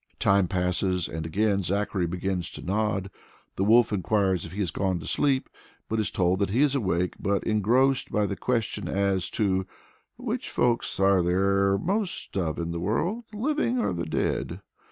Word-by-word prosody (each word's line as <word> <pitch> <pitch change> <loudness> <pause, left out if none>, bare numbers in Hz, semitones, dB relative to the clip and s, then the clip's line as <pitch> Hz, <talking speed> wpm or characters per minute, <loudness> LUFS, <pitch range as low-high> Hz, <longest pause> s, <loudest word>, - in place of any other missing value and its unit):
Time 100 -2 +3
passes, 90 -1 0
and 80 0 -5
again 100 +3 +1
Zachary 100 0 -1
begins 90 0 -2
to - - -8
nod. 100 0 -1 0.4
The 95 - 0
wolf 110 +1 +5
enquires 95 -2 +1
if - - -9
he 95 - -9
has 100 -4 -1
gone 95 -2 0
to - - -9
sleep, 135 -2 +1 0.4
but 110 - -1
is 110 - 0
told 90 0 +1
that 100 - +1
he 115 +7 +1
is 145 -2 +2
awake, 90 -8 0
but 100 0 0
engrossed 120 +6 +2
by 105 -1 +2
the 100 - -2
question 115 0 -1
as 100 -2 0
to 95 -3 0 0.5
"which - - -3
folks 120 -4 0
are 95 -1 +4
there 100 +2 +2
most 195 - -2
of 85 -5 -1
in 85 0 -3
the 85 - -3
world 170 - -1
the 210 - -9
living 265 0 0
or 240 - 0
the - - -3
dead." - - -2
100 Hz, 180 wpm, -26 LUFS, 95-110 Hz, 0.5 s, wolf